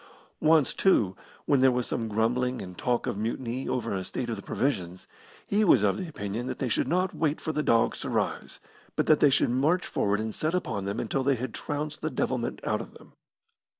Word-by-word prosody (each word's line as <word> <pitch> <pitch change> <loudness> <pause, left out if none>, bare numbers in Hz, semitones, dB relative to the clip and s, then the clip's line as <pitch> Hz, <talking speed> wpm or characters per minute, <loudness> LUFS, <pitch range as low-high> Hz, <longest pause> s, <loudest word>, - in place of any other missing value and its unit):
Once, 155 -3 +4
too, 105 - +3 0.3
when 140 -3 +3
there 130 - +7
was 125 -1 0
some 115 - -2
grumbling 120 +4 0
and 90 -1 -7
talk 120 +5 0
of - - -2
a - - -6
mutiny 120 +3 -3
over 120 -5 -1
the 95 - -2
state 120 +5 -4
of - - -1
the 100 - -8
provisions, 95 -9 -2 0.4
he 210 +2 +2
was 135 - +5
of 100 -2 +2
opinion 120 - -4
that - - -4
they 130 - -2
should - - +1
not 185 +2 +1
wait 155 -2 0
for 160 - -3
the 150 - -1
dogs 115 -6 +2
to - - -4
rise, - - -2 0.4
but - - +1
that 155 - +5
they 145 - +6
should 130 - +2
march 150 +9 +2
forward 100 +1 0
and 110 0 -3
set 155 - -1
upon 105 - -2
them 100 +1 -2
until 125 +4 -1
they 135 +1 +2
had 125 0 -5
trounced 150 0 -4
the 155 - -1
devilment 125 -3 -2
out - - 0
of - - -11
them. - - -16
125 Hz, 220 wpm, -28 LUFS, 110-150 Hz, 0.4 s, there